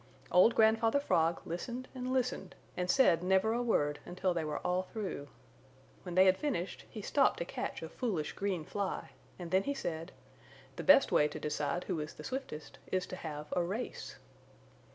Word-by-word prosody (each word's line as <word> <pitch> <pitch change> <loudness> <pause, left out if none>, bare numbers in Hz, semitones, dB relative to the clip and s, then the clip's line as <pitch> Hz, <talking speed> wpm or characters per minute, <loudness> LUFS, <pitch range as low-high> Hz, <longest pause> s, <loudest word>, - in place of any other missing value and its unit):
Old 185 +6 +6
Grandfather 225 +3 +4
Frog 165 - +1
listened 240 +9 -5
and 255 -1 -4
listened 255 -1 -1 0.2
and 180 0 -2
said 180 -9 +5
never 190 +4 +3
a 240 - 0
word 150 -11 +1
until 180 +1 -1
they 165 -2 -1
were 150 -1 -2
all 180 +1 +2
through. 185 -7 -5 0.7
When 175 - -6
they 185 +1 +7
had 185 0 +4
finished, 240 - -2
he 215 - -8
stopped 275 +5 +3
to 170 - -3
catch - - -4
a - - -4
foolish 185 -11 -2
green 190 -5 -2
fly 200 +2 -3 0.3
and 175 -2 -7
then 190 +1 +4
he 280 +7 -2
said: 165 -8 -4 0.6
"The - - -5
best 280 -1 +6
way 150 - +5
to 150 - -7
decide 150 +2 -1
who 160 - -2
is 150 0 -5
the - - -10
swiftest 255 - -6
is 185 -1 +1
to - - -7
have 150 -3 -6
a 180 - +3
race." 200 +8 -4
185 Hz, 185 wpm, -33 LUFS, 165-225 Hz, 0.7 s, they